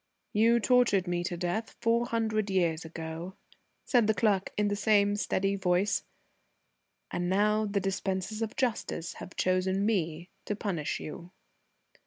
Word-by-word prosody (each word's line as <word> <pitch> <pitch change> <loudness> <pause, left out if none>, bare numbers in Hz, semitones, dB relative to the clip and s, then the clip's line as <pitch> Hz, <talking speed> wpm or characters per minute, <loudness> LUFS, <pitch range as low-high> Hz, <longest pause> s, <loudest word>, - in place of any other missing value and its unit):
"You 230 +3 +4
tortured 235 -6 +3
me 175 0 -1
to 175 -1 -3
death 180 +6 -2
four 235 +1 +2
hundred 220 -2 0
years 170 -4 +1
ago," 165 +3 -6 0.5
said 240 -4 +3
the 220 - +3
clerk 195 -1 +2
in 210 0 +2
the 205 - 0
same 205 -1 +3
steady 195 -1 0
voice, 190 +1 +1 1.1
"and 175 0 -1
now 210 +3 +2
the 200 0 0
dispensers 195 +2 -2
of 225 0 -3
justice 220 -9 -2
have 185 - -9
chosen 185 +2 +1
me 175 -5 -1
to 210 - -2
punish 185 -8 -2
you." 170 +3 -8
195 Hz, 145 wpm, -29 LUFS, 180-215 Hz, 1.1 s, You